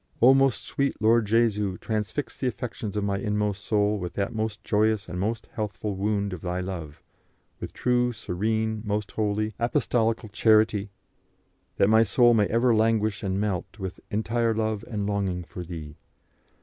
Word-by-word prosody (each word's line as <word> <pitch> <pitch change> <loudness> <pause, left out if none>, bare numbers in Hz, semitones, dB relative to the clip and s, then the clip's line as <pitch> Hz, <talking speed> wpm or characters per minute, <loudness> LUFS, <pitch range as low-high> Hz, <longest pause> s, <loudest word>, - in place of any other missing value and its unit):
"O 125 +3 +7
most 135 -5 +2
sweet 140 0 -1
Lord 110 0 +3
Jesu, 105 -4 +2
transfix 110 - -3
the 130 - -2
affections 110 -3 -4
of 105 - 0
my 100 -1 0
inmost 105 0 -1
soul 105 -1 +1
with 90 -2 -5
that 100 +3 -2
most 110 -1 -3
joyous 110 -1 +1
and 90 +1 -5
most 110 +3 -2
healthful 105 -2 -3
wound 100 0 -1
of 90 - -7
Thy 90 0 -2
love, 90 -6 -6 0.6
with - - -6
true, 125 0 +1
serene, 110 +1 -2
most 105 -1 -2
holy, 110 0 -1
apostolical 115 -2 0
charity; 110 -1 +3 0.9
that 100 - +4
my 110 +1 +6
soul 120 +3 +4
may 105 -3 +3
ever 115 +2 +3
languish 110 -2 +2
and 95 -1 -1
melt 100 -1 -2
with 95 -3 -6
entire 115 +2 0
love 110 -1 -1
and 105 -3 -2
longing 100 -3 -1
for 90 +1 -8
Thee. 80 -3 -8
105 Hz, 160 wpm, -26 LUFS, 100-110 Hz, 0.9 s, O